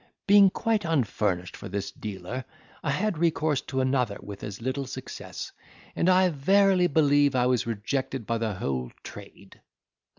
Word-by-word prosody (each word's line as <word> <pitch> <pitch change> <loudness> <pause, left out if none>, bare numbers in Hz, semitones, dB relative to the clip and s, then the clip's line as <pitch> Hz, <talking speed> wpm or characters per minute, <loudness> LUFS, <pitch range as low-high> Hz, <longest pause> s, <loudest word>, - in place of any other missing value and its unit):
Being 200 -1 +7
quite 220 +2 0
unfurnished 105 - 0
for - - -9
this 100 +1 -3
dealer, 105 +5 -6 0.4
I 145 - -2
had 180 +4 0
recourse 155 -4 +1
to 130 -1 -2
another 130 -5 0
with 100 -1 -9
as 105 -2 -6
little 130 +3 -3
success; 130 0 -7 0.4
and 175 - +2
I 185 0 +5
verily 185 +4 +3
believe, 145 -3 +3
was 125 -1 +2
rejected 130 +3 -3
by 115 +1 -1
the 110 -3 -2
whole 65 -7 -3
trade. - - -12
130 Hz, 145 wpm, -27 LUFS, 110-165 Hz, 0.4 s, Being